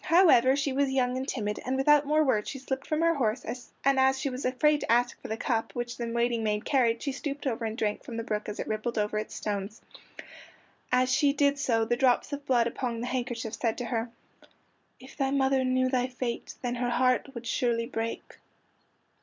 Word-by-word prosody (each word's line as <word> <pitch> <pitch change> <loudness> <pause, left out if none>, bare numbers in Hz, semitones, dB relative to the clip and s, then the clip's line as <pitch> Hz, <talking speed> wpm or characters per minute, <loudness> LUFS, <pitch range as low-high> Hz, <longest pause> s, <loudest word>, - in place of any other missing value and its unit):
However, 310 -7 +6
she 280 -1 -1
was 280 0 +1
young 255 -2 +1
and 260 +1 -3
timid, 210 -6 -2
and 260 +1 -1
without 290 +1 +4
more 305 +1 +3
words 220 -7 +1
she - - -5
slipped 265 +1 -4
from 310 +1 0
her 335 0 +4
horse, 245 -6 -1 0.4
and 275 -1 +4
as 265 0 +3
she 275 -1 -2
was 255 +2 -5
afraid 290 +4 +3
to - - -2
ask 240 +1 +2
for - - -7
the 220 - -3
cup, 225 -2 -2
which 240 0 -3
the 235 -1 -3
waiting 235 -1 0
maid 210 -1 -1
carried, 235 -4 +2
she 280 - -1
stooped 280 +1 -5
over 235 -3 -1
and 220 0 -4
drank 210 -3 -1
from 230 - -7
the 230 - -2
brook 210 -1 -3
as 210 - -6
it - - -3
rippled 220 +2 -2
over 210 0 0
its 215 - -6
stones. 205 +1 -4 1.1
As 255 +1 +3
she 280 +1 +4
did 280 0 +2
so 225 -5 +1
the 240 - +1
drops 255 +2 +2
of 285 0 -6
blood 240 -3 +3
upon 235 0 -3
the - - -2
handkerchief 240 -3 -3
said 230 -3 -1
to 245 - -3
her:— 230 0 -2 0.9
"If 260 +1 -14
thy 270 -1 +1
mother 270 -1 +2
knew 255 0 +2
thy 255 -1 +1
fate 250 -2 -5
Then 245 -1 -1
her 245 - +1
heart 255 +2 +1
would 235 0 -7
surely 230 0 0
break." 230 -2 -5
250 Hz, 220 wpm, -28 LUFS, 230-270 Hz, 1.1 s, However